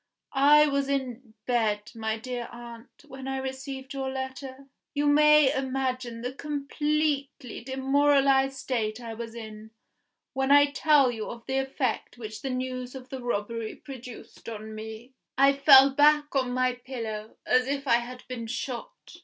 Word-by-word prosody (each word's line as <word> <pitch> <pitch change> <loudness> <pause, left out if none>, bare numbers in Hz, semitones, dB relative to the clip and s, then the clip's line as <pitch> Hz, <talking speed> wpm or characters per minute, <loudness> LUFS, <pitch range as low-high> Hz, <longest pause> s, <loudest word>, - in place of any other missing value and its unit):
I 295 +2 +6
was 280 -1 0
in 255 -4 -3
bed, 215 -4 0
my 220 -1 -2
dear 245 +1 -5
aunt, 235 +3 -12
when 265 -1 -9
I 270 0 -2
received 265 +1 -6
your 270 -1 -3
letter. 265 0 -6 0.3
You 290 +1 +1
may 300 -1 +6
imagine 255 -3 -2
the 250 +2 -4
completely 290 -3 -2
demoralised 270 0 +2
state 225 -4 -2
I 230 -2 -7
was 230 0 -7
in, 220 -1 -9 0.6
when 265 0 0
I 285 0 +6
tell 290 -4 +4
you 220 -3 -5
of 235 -1 -9
the 265 0 0
effect 265 -3 -2
which 215 -2 -8
the 270 - -3
news 255 0 -4
of 260 -1 -10
the 265 -1 -6
robbery 230 -1 -3
produced 250 -4 -11
on 220 -1 -7
me. 220 +3 -9 0.2
I 275 +1 +6
fell 275 -1 +8
back 295 +1 +3
on 260 -2 +1
my 255 0 +1
pillow, 220 -4 -6
as 255 0 +3
if 280 0 -3
I 235 -2 +5
had 250 +1 -7
been 235 -3 -6
shot. 255 - -6
260 Hz, 155 wpm, -27 LUFS, 235-275 Hz, 0.6 s, fell